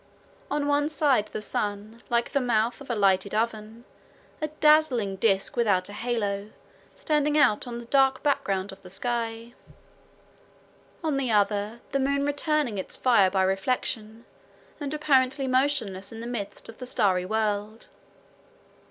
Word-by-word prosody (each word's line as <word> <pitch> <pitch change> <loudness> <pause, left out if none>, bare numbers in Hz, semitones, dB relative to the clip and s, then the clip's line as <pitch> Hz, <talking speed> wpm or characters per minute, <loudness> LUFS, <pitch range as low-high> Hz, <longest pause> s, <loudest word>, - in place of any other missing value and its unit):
On 290 0 -1
one 290 +1 +2
side 280 -8 +2
the 210 - -6
sun, 210 +2 -4
like 235 -1 +1
the 280 - +1
mouth 235 0 0
of 275 - -11
a 240 - 0
lighted 195 0 +2
oven, 225 +1 -3 0.6
a 305 - 0
dazzling 300 -10 +3
disc 195 -1 +1
without 200 -6 +1
a - - -8
halo, 205 -3 -2 0.5
standing 300 -1 +1
out 265 -5 +3
on 235 -1 -5
the 235 - -8
dark 270 +1 +2
background 200 -9 0
of 190 - -13
the 180 - -12
sky! 230 +3 -3 1.5
On 305 -4 0
the 265 -3 -1
other, 210 +1 +1
the 275 - 0
moon 280 +1 +1
returning 290 -6 0
its 190 - -3
fire 220 -7 +4
by 190 0 +1
reflection, 215 +3 -1 0.5
and 285 -2 -4
apparently 275 -3 +2
motionless 255 -8 0
in 225 - -8
the 230 - -6
midst 235 -5 -5
of 225 - -12
the 250 - -6
starry 195 -7 +2
world. 215 +1 -2
235 Hz, 150 wpm, -26 LUFS, 205-275 Hz, 1.5 s, fire